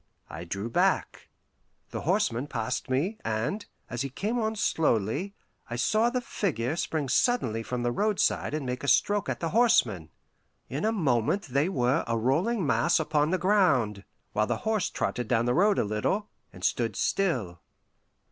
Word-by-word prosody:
I - - -7
drew 100 +5 -4
back. 115 - 0 0.6
The - - -4
horseman 120 +5 0
passed 125 0 -3
me, 165 +12 0
and, 115 - -2 0.2
as 120 +1 -4
he 135 - -2
came 210 - -2
on 220 -1 -1
slowly, 160 - 0 0.3
I 120 - -3
saw 215 - +2
the 250 0 -1
figure 145 - -2
spring 155 -4 -2
suddenly 130 - +1
from 120 +1 -3
the 120 - +1
roadside 205 - 0
and 150 -3 -3
make 125 +1 -4
a - - -3
stroke 205 +7 +2
at - - -3
the 165 - -1
horseman. 125 - +3 0.6
In 140 +9 -2
a 220 - +3
moment 155 - +1
they 140 +4 0
were 130 -2 +1
a 115 0 0
rolling 165 - +1
mass 170 +4 +2
upon 150 -1 +1
the 185 - +1
ground, 170 - +2 0.3
while 105 - +1
the - - 0
horse 220 -4 +1
trotted 125 -2 -2
down 115 0 +2
the 120 - +2
road 200 +5 +3
a - - +2
little, 110 - -1 0.2
and 90 - -13
stood 115 0 0
still. 120 - 0
140 Hz, 170 wpm, -28 LUFS, -, 0.6 s, horseman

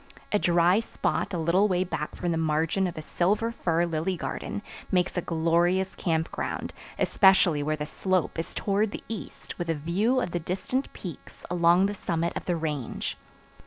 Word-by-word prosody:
A 210 - +3
dry 175 +2 +4
spot 225 -3 -1
a 180 - -1
little 170 +5 +3
way 185 -2 +2
back 155 -4 -4
from 175 - -1
the 165 - 0
margin 160 +4 +1
of 175 - -6
a 155 - -5
silver 205 +9 +1
fir 170 -6 +1
lily 170 +2 -1
garden 205 - -4 0.3
makes 180 -2 +2
a 180 - +1
glorious 170 +3 +1
camp 160 -3 -1
ground, - - -4 0.2
especially 190 -6 +4
where 155 +1 0
the 150 -1 -4
slope 185 +1 -1
is 165 - -4
toward 205 +1 +1
the - - -6
east 220 -3 -7
with 175 -1 -3
a 165 - +2
view 190 - +1
of 180 - -2
the 175 - -1
distant 190 - -2
peaks 175 -7 -9
along 175 +1 +5
the 205 - 0
summit 170 -3 -1
of - - -4
the 175 - +1
Range. 150 -6 -3
175 Hz, 185 wpm, -27 LUFS, 165-190 Hz, 0.3 s, along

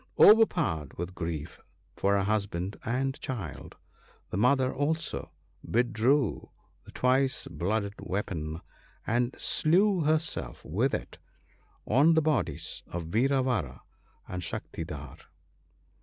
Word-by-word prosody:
Overpowered 160 - +5
with 85 +2 -4
grief 80 -3 -5 0.4
for 100 +1 +2
her 100 - +1
husband 100 -2 -1
and 130 +3 -1
child, 105 - -6 0.6
the - - -2
mother 130 +4 +3
also 160 +4 -2 0.3
withdrew 120 +2 +1 0.4
the - - -12
twice 130 +1 +2
blooded 100 +5 -1
weapon, 80 -5 -3 0.4
and 120 +2 0
slew 185 +5 +3
herself 155 +2 -1
with 115 - +1
it - - -7 0.7
on 145 +8 +5
the 160 - +5
bodies 85 - 0
of 85 -2 -5
Vira 130 +6 +2
vara 90 - -2 0.4
and 90 0 -4
Shaktidhar. 80 -4 -6
110 Hz, 110 wpm, -29 LUFS, 85-135 Hz, 0.7 s, Overpowered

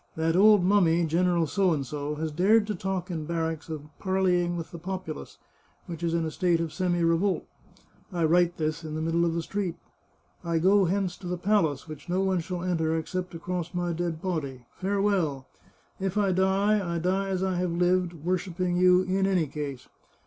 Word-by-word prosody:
That 160 +1 0
old 205 0 +6
mummy. 175 -3 +3
General 170 +1 +2
P, 200 +6 -3 0.6
has 160 0 -2
dared 205 +7 +4
to 210 - -2
talk 190 -1 -3
in 160 -3 -3
barracks 165 -1 -2
of 155 -2 -5 0.2
parleying 180 -2 +1
with 165 - -6
the 170 - -8
populace, 185 -3 -6 0.5
which 170 -2 -7
is 170 -1 0
in 165 -1 0
a 160 - -3
state 175 0 +1
of 165 -2 -3
semi 175 -2 0
revolt. 165 +4 +1 0.7
I 175 -2 -1
write 175 +2 +3
this 155 +1 -2
in 155 -1 -5
the 155 - -2
middle 165 +1 +1
of 165 -1 0
the 170 - -1
street. 190 -2 -3 0.7
I 170 -1 0
go 190 +4 +4
hence 185 0 0
to 180 - -9
the 180 0 -2
palace, 170 -8 +1
which 155 0 -10
no 185 +2 +1
one 190 -2 +1
shall 175 +1 -4
enter 165 -3 0
except 180 +2 -4
across 175 +1 -4
my 175 -1 -1
dead 165 -1 -3
body. 140 -9 -3
Farewell! 190 -8 0 0.5
If 195 +1 -2
I 200 -2 +3
die, 190 0 +2
I - - 0
die 190 +3 0
as 190 -1 -1
I 190 -1 0
have 180 0 0
lived, 180 0 +2
worshipping 175 +2 -2
you 180 0 +5
in 190 +1 +1
any 185 -4 +2
case. 140 -3 -6
175 Hz, 190 wpm, -27 LUFS, 165-190 Hz, 0.7 s, old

